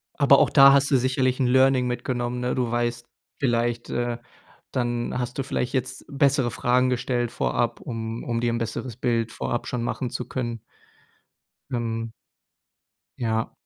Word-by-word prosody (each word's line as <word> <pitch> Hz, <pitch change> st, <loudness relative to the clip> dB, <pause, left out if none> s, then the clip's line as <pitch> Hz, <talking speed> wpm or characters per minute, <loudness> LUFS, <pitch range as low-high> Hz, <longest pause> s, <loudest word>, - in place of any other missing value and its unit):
Aber 140 Hz, -1 st, +6 dB
auch -, -, +4 dB
da 140 Hz, -1 st, +8 dB
hast 140 Hz, +1 st, +3 dB
du 135 Hz, -, +5 dB
sicherlich 130 Hz, +1 st, +1 dB
'n 130 Hz, -, +2 dB
Learning 130 Hz, 0 st, +4 dB
mitgenommen. 125 Hz, 0 st, -2 dB
Ne, 125 Hz, -, -1 dB
du 125 Hz, -2 st, 0 dB
weißt 120 Hz, 0 st, -1 dB, 0.3 s
vielleicht, 120 Hz, -2 st, 0 dB
äh 120 Hz, -1 st, -1 dB, 0.6 s
dann 120 Hz, 0 st, -1 dB
hast 125 Hz, +1 st, -4 dB
du 135 Hz, -, -1 dB
vielleicht 125 Hz, -1 st, -2 dB
jetzt 130 Hz, 0 st, -2 dB
bessere 140 Hz, -3 st, +2 dB
Fragen 125 Hz, +1 st, +2 dB
gestellt 125 Hz, -1 st, -1 dB
vorab, 120 Hz, -1 st, -1 dB
um 115 Hz, -1 st, -5 dB
um 115 Hz, -1 st, -2 dB
dir 120 Hz, 0 st, +1 dB
'n -, -, 0 dB
besseres 115 Hz, +1 st, -4 dB
Bild 115 Hz, -2 st, 0 dB
vorab 120 Hz, -, -3 dB
schon 120 Hz, -2 st, -2 dB
machen 125 Hz, 0 st, -2 dB
zu 125 Hz, -, -4 dB
können. 120 Hz, -3 st, -4 dB, 1.1 s
Ähm. 115 Hz, -1 st, -2 dB, 1.1 s
Ja. 115 Hz, -1 st, -1 dB
120 Hz, 160 wpm, -24 LUFS, 120-130 Hz, 1.1 s, da